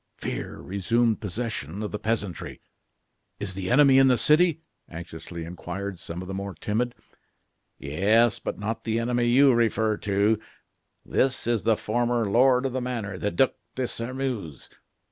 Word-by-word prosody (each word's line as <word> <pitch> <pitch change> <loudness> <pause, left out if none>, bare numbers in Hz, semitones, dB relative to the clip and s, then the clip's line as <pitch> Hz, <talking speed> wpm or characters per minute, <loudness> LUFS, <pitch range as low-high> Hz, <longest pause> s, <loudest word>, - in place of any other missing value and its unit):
Fear - - -5
resumed 110 +4 +1
possession 105 - -4
of 105 - -4
the 105 - -4
peasantry. 105 -5 -3 0.8
"Is 95 -2 -3
the 95 -1 -4
enemy 135 +1 +6
in 135 - +6
the 125 -2 +4
city?" 160 +2 +3 0.3
anxiously 85 0 -8
inquired 90 +2 -6
some 85 +2 -6
of - - -10
the 95 - -5
more 100 -1 -5
timid. 115 +8 -2 0.8
"Yes; 105 - +2
but - - -4
not 110 +2 -4
the 115 -1 -1
enemy 120 +1 +1
you 130 +2 +6
refer 110 -2 +2
to. 105 +2 +1 0.7
This 130 -1 +1
is 120 -2 +1
the 110 -1 +2
former 120 +1 0
lord 125 +4 +4
of 130 - -1
the 130 - -1
manor, 115 -7 -4
the 105 - 0
Duc 135 +4 +2 0.2
de 130 -1 -1
Sairmeuse." 120 - -4
110 Hz, 155 wpm, -26 LUFS, 100-125 Hz, 0.8 s, enemy